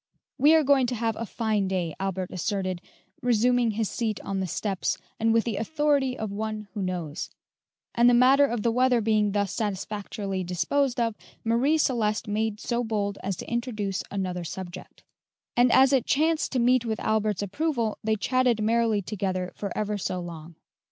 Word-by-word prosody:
[Illustration: 280 - +4
0070] - - +9
"We 320 - +7
are 320 - +5
going 270 -2 +4
to 245 - -2
have 225 -1 -1
a 230 - -4
fine 215 -4 0
day," 180 -4 -2
Albert 190 -1 -3
asserted, 185 -1 -2 0.4
resuming 245 0 +3
his 220 0 -1
seat 220 -2 -2
on 195 -1 -3
the 190 - -1
steps, 195 +1 -1 0.2
and 225 0 +2
with 225 0 +3
the 225 -4 -3
authority 285 +1 +1
of 220 -2 -4
one 215 0 -4
who 210 - -4
knows; 180 -4 -3 0.6
and 240 0 +5
the 245 - +5
matter 270 +3 +6
of 235 -5 -3
the 235 - +2
weather 250 0 +3
being 210 -2 +2
thus 200 -2 0
satisfactorily 200 -1 -3
disposed 250 +9 0
of, 230 -1 +1 0.3
Marie 245 +7 +2
Celeste 225 -7 0
made 215 0 -1
so 240 +1 -1
bold 205 -3 -2
as 195 0 -2
to - - -8
introduce 220 -5 -2
another 185 -3 -3
subject; 180 +1 -8 0.5
and 245 0 +4
as 265 +1 +6
it 260 -4 +2
chanced 315 +2 +2
to - - +1
meet 250 0 +3
with 220 -2 -2
Albert's 215 -2 0
approval, 235 - -1
they 220 0 +1
chatted 250 +1 +1
merrily 220 -1 +2
together 185 -2 -2
for 200 -2 -5
ever 210 -1 -1
so 185 -1 -2
long. 165 -1 -8
220 Hz, 185 wpm, -26 LUFS, 195-245 Hz, 0.6 s, 0070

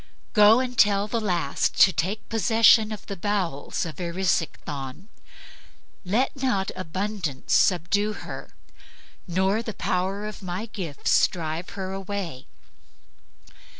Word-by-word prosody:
Go 215 +1 +7
and 255 -1 -3
tell 205 -2 +4
the 230 +1 -1
last 175 -9 0
to 190 - +7
take 195 +7 -2
possession 225 -1 +4
of 215 - -7
the 200 - -5
bowels 185 -7 -2
of 165 +1 -8
Erisichthon. 170 - -2 0.9
Let 220 +8 0
not 200 -8 0
abundance 185 -5 -3
subdue 200 +4 +2
her, - - -9 0.7
nor 190 +5 +1
the 220 -3 -6
power 190 +3 -1
of 215 -1 -7
my 185 +3 -4
gifts 175 -10 +1
drive 165 0 -5
her 190 -1 -4
away. 195 -8 -5
195 Hz, 115 wpm, -25 LUFS, 175-210 Hz, 0.9 s, Go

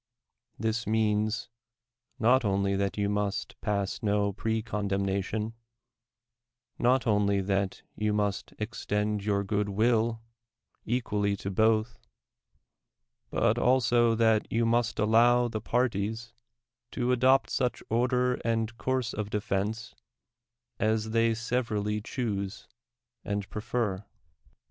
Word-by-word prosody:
This 110 +1 -2
means, 110 +1 +1 0.7
not 125 +4 +4
only 100 -1 +1
that 100 0 0
j'ou 100 -1 -1
must 105 -1 -2
pass 100 -2 -1
no 105 -1 +1
pre 110 +2 -1
condemnation, 100 0 -2 1.3
not 125 +1 +3
only 105 -2 +2
that 100 0 -1 0.2
3 105 0 +1
ou - - +1
must 105 -2 -1
extend 105 -2 -2
your 100 -1 +1
good 100 0 -1
will 115 +2 +2 0.7
equally 105 -4 0
to 100 - -4
both, 110 +3 +2 1.3
but - - +1
also 120 -2 +3
that 110 -1 +2
you 115 0 +2
must 115 0 +1
allow 120 +3 +4
the 110 -2 -4
parties 115 -1 -1 0.6
to 125 -1 0
adopt 130 +2 +3
such 125 -1 -1
order 125 +2 +1
and 115 0 -1
course 130 -3 -1
of 105 -1 -3
defense 105 +2 -2 0.9
as 110 0 0
they 115 0 +2
severally 110 -3 -1
choose 105 -4 -4 0.6
and 100 -2 -3
prefer. 105 -3 -2
110 Hz, 110 wpm, -28 LUFS, 105-115 Hz, 1.3 s, not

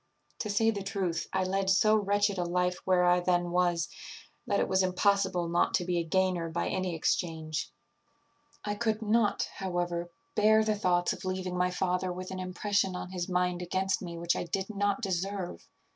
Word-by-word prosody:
To 215 - -3
say 225 +2 +3
the 200 -2 -4
truth, 190 -4 -2
I 190 - +1
led 190 +1 0
so 215 +3 +5
wretched 205 -1 +1
a - - +1
life 180 +1 0
where 185 -1 +3
I 180 0 +5
then 175 -1 +1
was, 175 -1 +1 0.6
that 200 - +1
it - - +1
was 190 0 +2
impossible 185 -1 +2
not 170 +1 +2
to 180 - 0
be 175 -1 0
a - - 0
gainer 180 0 0
by 165 - -2
any 185 -2 -1
exchange. 160 -1 -1 1.0
"I 205 - -1
could 220 0 -1
not, 215 0 +2
however, 175 -2 -2 0.2
bear 220 +1 +5
the 215 0 +1
thoughts 180 -4 +1
of - - -9
leaving 185 -1 -3
my 180 0 +2
father 180 0 -1
with 185 +1 -6
an 190 - -5
impression 190 +1 0
on 180 0 -6
his 180 -1 -3
mind 180 -1 0
against 190 +2 -1
me 170 -2 -6
which 170 0 0
I - - -2
did 190 +4 -3
not 205 +1 0
deserve. 190 - -3
185 Hz, 190 wpm, -30 LUFS, 175-200 Hz, 1.0 s, so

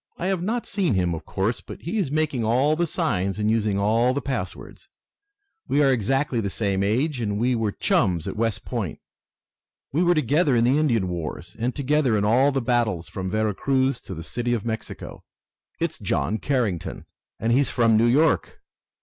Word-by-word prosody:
"I 175 - -4
have 190 -3 0
not 230 +6 -1
seen 185 - 0
him, 90 -2 +1
of 80 -1 -6
course, 100 +5 -1
but - - -10
he 185 +7 -2
is 175 -9 0
making 150 -5 0
all 130 +7 +2
the 170 +1 0
signs 95 - -1
and 105 0 +1
using 105 -3 +1
all 115 +5 +2
the - - +1
passwords. 115 -9 -5 0.8
We 145 - +3
are 135 - +4
exactly 130 +1 0
the 100 - -2
same 100 -1 -1
age, 125 +7 0
and 105 -2 -1
we 125 +4 +1
were 110 -3 0
chums 90 -4 +1
at - - -4
West 115 -1 -1
Point. - - -3 1.0
We 155 - +2
were 175 0 +4
together 150 0 +2
in 115 - +3
the 130 +5 +3
Indian 115 -11 +1
wars, 85 0 -5
and 120 +2 -1
together 140 -4 +2
in 100 - +1
all 130 +6 +4
the 135 -2 -1
battles 115 -9 0
from 95 -1 -4
Vera 110 +1 0
Cruz 135 +4 0
to 95 - -8
the 80 - -7
City 120 +8 -1
of 115 - -5
Mexico. 110 -1 -6 0.6
It's - - -2
John 105 +11 -1
Carrington, 115 - -2 0.3
and 115 - 0
he's 135 +3 +3
from 115 -2 +3
New 115 +2 +4
York! 150 +7 +2
115 Hz, 190 wpm, -24 LUFS, 105-140 Hz, 1.0 s, are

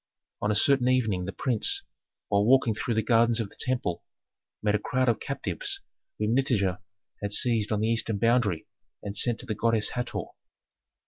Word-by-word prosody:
On 105 - 0
a 105 - +2
certain 130 +3 +3
evening 110 -8 +1
the 100 - -4
prince, 120 +2 0 0.5
while 100 0 +3
walking 125 0 +4
through 115 +2 -2
the 110 - +1
gardens 115 -1 +3
of 110 -4 -3
the - - -16
temple, 125 -10 -1 0.6
met 105 -1 +2
a 105 - +2
crowd 130 +4 0
of 120 - +2
captives 395 - -3 0.4
whom 105 +1 0
Nitager 105 -9 +1 0.4
had 100 -1 -3
seized 110 0 +2
on 105 -1 0
the 110 - +1
eastern 115 -2 0
boundary 115 -6 +1 0.4
and 100 0 -5
sent 120 0 +2
to - - -11
the 110 - -2
goddess 110 0 +1
Hator. 125 -1 -3
115 Hz, 180 wpm, -27 LUFS, 105-125 Hz, 0.6 s, walking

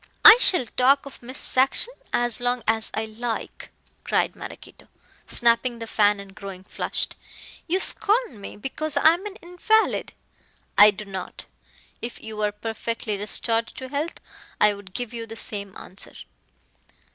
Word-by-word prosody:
"I 435 - +13
shall 360 - +3
talk 265 +5 +2
of 275 - -11
Miss 255 +3 -6
Saxon 270 - +3 0.2
as 240 0 +1
long 245 -1 0
as 220 0 +1
I 220 - -1
like," 225 +1 -5 0.3
cried - - 0
Maraquito, - - -11 0.4
snapping 235 +1 +2
the 230 - -6
fan 210 -2 +2
and 200 -1 -11
growing 195 -2 -9
flushed. - - -1 0.5
"You 360 +3 +2
scorn 420 - +1
me 195 - -9
because 295 +7 -3
I - - +7
am 370 +5 -5
an 400 - -9
invalid 360 +6 +1 0.3
" - - -37
"I - - +8
do 210 +1 -5
not. 190 -2 -7 0.6
If 235 - -6
you 220 0 -8
were 210 -1 0
perfectly 225 +1 -4
restored 225 +3 +1
to 260 -1 -9
health 295 +4 -3 0.4
I 210 0 +5
would 200 -2 -13
give 245 -1 -3
you 230 -1 -5
the 225 - -8
same 200 -3 -5
answer." 190 - -8
230 Hz, 160 wpm, -24 LUFS, 210-270 Hz, 0.6 s, I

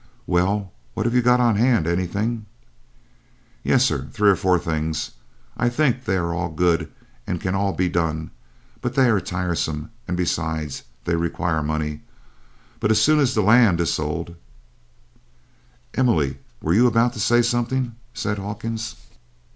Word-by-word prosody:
"Well, 95 +2 0 0.2
what - - -1
have 120 - +1
you 125 - +4
got 125 +1 +4
on 120 -4 +3
hand 115 -6 +3
anything?" 100 +6 -1 1.2
"Yes, - - +4
sir, - - -1
three 105 -1 +4
or - - +3
four 90 0 +2
things. 80 -2 -2 0.4
I 120 - +1
think 130 -1 +1
they 95 - +1
are 85 -2 -1
all 85 +1 -2
good 85 +1 +1 0.4
and 90 -1 -2
can 90 +2 -2
all 100 0 +1
be 95 -1 0
done, 80 -2 -1 0.5
but 125 +1 -3
they 130 -3 +5
are 105 - +3
tiresome, 85 -2 -3 0.2
and 90 0 -2
besides 80 -4 -2 0.2
they 85 - +1
require 85 -1 -1
money. 75 0 -2 0.8
But 105 - 0
as 110 -1 +4
soon 155 +7 +4
as 135 -4 +2
the 110 - +2
land 110 -4 +5
is 85 - +1
sold 85 +3 -3 0.8
" - - -33 0.7
"Emily, 80 - +1 0.2
were 80 - +2
you 120 +6 +5
about 120 +1 +2
to 115 - -8
say 120 +3 +4
something?" 120 +1 0 0.2
said 105 -1 -3
Hawkins. 110 +3 -5
95 Hz, 160 wpm, -22 LUFS, 85-115 Hz, 1.2 s, they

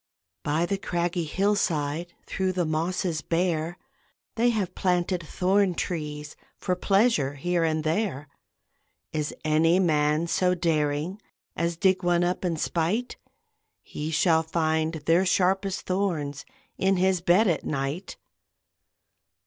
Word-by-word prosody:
By 155 +4 0
the 195 +2 -2
craggy 175 -1 -1
hillside, 170 -3 0
Through 190 -1 -1
the 180 -1 0
mosses 160 +1 -1
bare, 170 0 -1 0.6
They 235 +2 +2
have 200 -6 -1
planted 180 -1 0
thorn 185 +3 +1
trees 150 -4 -4 0.2
For 180 - -1
pleasure 195 - +2
here 175 +4 0
and 155 -1 0
there. 155 -3 -1 0.9
Is 150 -1 -1
any 160 +3 +3
man 155 -2 +2
so 180 +2 +1
daring 160 +2 -1 0.3
As 170 0 -1
dig 190 +1 +3
one 175 0 +2
up 180 +2 -1
in 170 -3 -1
spite? 175 +10 -1 0.7
He 150 +1 -5
shall 160 0 +3
find 160 0 0
their 170 +3 +4
sharpest 190 +1 +1
thorns 165 -7 -2 0.3
In 190 0 +2
his 185 -1 +2
bed 185 +6 +4
at 170 - 0
night. 140 +5 -3
170 Hz, 125 wpm, -26 LUFS, 155-185 Hz, 0.9 s, their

